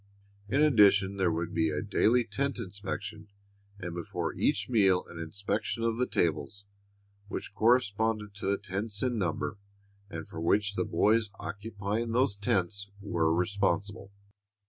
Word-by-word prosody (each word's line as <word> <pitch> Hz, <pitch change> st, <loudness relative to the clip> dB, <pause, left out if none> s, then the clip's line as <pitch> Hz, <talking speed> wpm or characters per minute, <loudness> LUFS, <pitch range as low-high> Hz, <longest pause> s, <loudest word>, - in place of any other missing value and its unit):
In 140 Hz, +6 st, +2 dB
addition 100 Hz, -8 st, +5 dB
there 95 Hz, -3 st, +2 dB
would 85 Hz, +1 st, -2 dB
be 80 Hz, -1 st, +2 dB
a 75 Hz, -1 st, -2 dB
daily 120 Hz, +4 st, +3 dB
tent 135 Hz, +5 st, -2 dB
inspection, 105 Hz, 0 st, -6 dB, 0.5 s
and 90 Hz, -3 st, -5 dB
before 85 Hz, -1 st, -3 dB
each -, -, +1 dB
meal 100 Hz, -7 st, +3 dB
an 85 Hz, -, -9 dB
inspection 100 Hz, +6 st, -2 dB
of 115 Hz, -1 st, +1 dB
the 125 Hz, -, +1 dB
tables, 90 Hz, +5 st, -1 dB, 0.6 s
which 105 Hz, -, -6 dB
corresponded 110 Hz, -1 st, +2 dB
to 100 Hz, -1 st, -5 dB
the 100 Hz, 0 st, +2 dB
tents 105 Hz, +1 st, -3 dB
in 125 Hz, -3 st, 0 dB
number 95 Hz, +3 st, -2 dB, 0.5 s
and 80 Hz, -2 st, -6 dB
for 80 Hz, -, -7 dB
which 100 Hz, +4 st, +2 dB
the -, -, -1 dB
boys 110 Hz, 0 st, +2 dB
occupying 105 Hz, +2 st, -3 dB
those 125 Hz, -4 st, +3 dB
tents 100 Hz, 0 st, -1 dB
were 85 Hz, -6 st, +1 dB
responsible. 100 Hz, +3 st, 0 dB
100 Hz, 145 wpm, -30 LUFS, 95-110 Hz, 0.6 s, addition